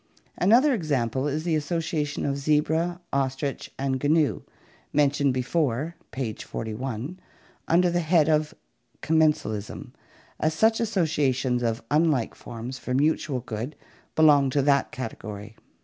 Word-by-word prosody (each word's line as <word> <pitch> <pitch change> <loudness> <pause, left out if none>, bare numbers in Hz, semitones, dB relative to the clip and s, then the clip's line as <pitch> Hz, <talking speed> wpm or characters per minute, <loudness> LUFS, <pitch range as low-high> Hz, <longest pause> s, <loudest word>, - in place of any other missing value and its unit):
Another 245 +10 +4
example 135 - 0
is 150 +2 -2
the 170 -1 0
association 155 -1 -2
of 140 - 0
zebra, 160 +4 +1
ostrich, 135 +1 -2
and 135 -1 -2
gnu, 155 0 +2 0.5
mentioned 145 -1 +2
before 135 +3 -1
(page 120 -5 -4
41) 125 +8 -5 0.5
under 175 +1 +4
the 175 - +1
head 160 -2 +3
of 155 -1 +1 0.5
commensalism, 150 -10 0 0.5
as 155 0 +1
such 220 +5 +3
associations 145 - +1
of 115 -1 -1
unlike 150 -6 +2
forms 120 +3 -7
for 125 - -3
mutual 145 -2 +1
good 120 +4 -5 0.4
belong 145 -3 +5
to 140 +1 +1
that 140 0 +2
category. 110 -3 -7
145 Hz, 120 wpm, -26 LUFS, 130-160 Hz, 0.5 s, belong